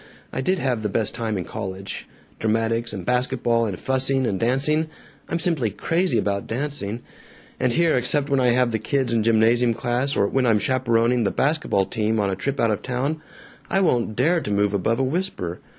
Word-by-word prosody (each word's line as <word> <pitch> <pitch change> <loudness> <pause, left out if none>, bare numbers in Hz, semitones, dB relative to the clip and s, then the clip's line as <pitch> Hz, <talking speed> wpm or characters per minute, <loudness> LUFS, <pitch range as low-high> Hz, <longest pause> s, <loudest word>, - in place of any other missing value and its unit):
I - - -1
did 185 +8 +1
have 125 -8 -1
the 105 - -1
best 105 +2 -1
time 115 -3 -2
in 90 - -2
college: 95 -2 -6 0.3
dramatics 115 +1 0
and 95 -4 -6
basket 125 +1 0
ball 115 -1 +2
and 95 -4 -5
fussing 130 0 +1
and 95 -5 -1
dancing 145 +6 +1 0.4
I'm 165 - 0
simply 160 -9 +1
crazy 170 - 0
about 100 -1 -1
dancing. 120 -3 -3 0.6
And 125 - +1
here, 170 +1 +3
except 135 +3 +2
when 140 -1 +1
I 125 - +3
have 125 0 +3
the 110 - -1
kids 130 +2 -1
in 115 - +2
gymnasium 115 +2 +3
class, 125 +4 -1
or 100 - +3
when 130 +4 +1
I'm 110 -2 +4
chaperoning 120 +1 +1
the 100 - +2
basket 150 +9 0
ball 95 -1 +2
team 110 +2 -1
on 100 -2 +1
a - - -1
trip 135 +8 -3
out 115 -1 +3
of 105 - -2
town, 135 +5 -2 0.5
I 195 - +2
won't 120 - +1
dare 165 +8 +2
to - - -5
move 105 0 +1
above 105 +4 +1
a 135 - +1
whisper. 130 - -2
120 Hz, 205 wpm, -23 LUFS, 110-135 Hz, 0.6 s, I'm